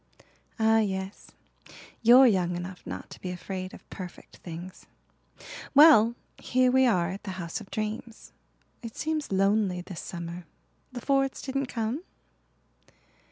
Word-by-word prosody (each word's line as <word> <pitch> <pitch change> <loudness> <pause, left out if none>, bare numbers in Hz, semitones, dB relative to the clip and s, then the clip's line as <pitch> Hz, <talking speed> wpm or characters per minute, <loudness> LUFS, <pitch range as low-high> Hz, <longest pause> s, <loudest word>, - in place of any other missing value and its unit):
"Ah 225 -1 +4
yes, 190 -2 -3 0.7
you're 245 +3 +8
young 180 -6 +2
enough 180 +1 -6
not - - -7
to - - -11
be 185 - -4
afraid 185 +1 -5
of - - -14
perfect 180 -2 -9
things. 175 +2 -9 0.9
Well, 275 -7 +8 0.2
here 255 0 +2
we 260 0 +5
are 180 -6 +2
at 195 - -7
the 195 -2 -6
House 170 +2 -4
of 195 - -12
Dreams. 220 +2 -5 0.5
It 230 -2 -8
seems 310 -4 -2
lonely 195 -1 +2
this 180 -1 -8
summer. 170 0 -7 0.4
The 245 -1 -7
Fords 270 +1 +1
didn't 275 0 -2
come?" 235 +5 -2
210 Hz, 135 wpm, -28 LUFS, 185-245 Hz, 0.9 s, you're